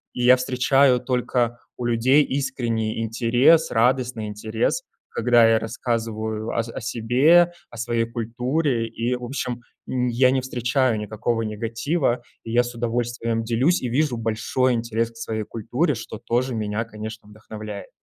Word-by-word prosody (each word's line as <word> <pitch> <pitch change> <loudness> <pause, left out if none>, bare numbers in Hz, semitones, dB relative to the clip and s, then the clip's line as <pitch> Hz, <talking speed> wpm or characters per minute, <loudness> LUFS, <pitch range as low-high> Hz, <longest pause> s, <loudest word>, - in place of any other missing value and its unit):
и 125 - -3
я 125 +1 +8
встречаю 130 +1 +3
только 125 -1 -1 0.2
у 120 - -5
людей 125 +5 +4
искренний 115 -6 -2
интерес, 120 +8 +3
радостный 125 -1 +1
интерес, 110 - -2 0.3
когда 120 -1 +4
я 115 - +4
рассказываю 110 -1 -3
о 115 - +2
с 115 - -8
о - - -6
себе, 130 +10 +4 0.2
о 120 - -11
своей 115 0 0
культуре, 120 +2 -1
и, 115 +2 -2
в 125 - -8
общем, 125 -1 -4 0.3
м, 125 -1 0
я 125 +2 +4
не 130 0 +1
встречаю 125 -2 0
никакого 110 +2 -2
негатива, 115 +5 -1 0.2
я 120 +2 +2
с 120 0 -7
удовольствием 115 -1 -1
делюсь 125 +10 +2
и 125 - -2
вижу 135 0 +1
большой 115 +3 0
интерес 115 0 -1
к - - -26
своей 110 -1 -3
культуре, 125 +7 -1
что 110 -1 -7
тоже 125 +2 -1
меня, 110 0 -2
конечно, 110 -1 -8
вдохновляет. 105 -1 -9
120 Hz, 150 wpm, -23 LUFS, 115-125 Hz, 0.3 s, я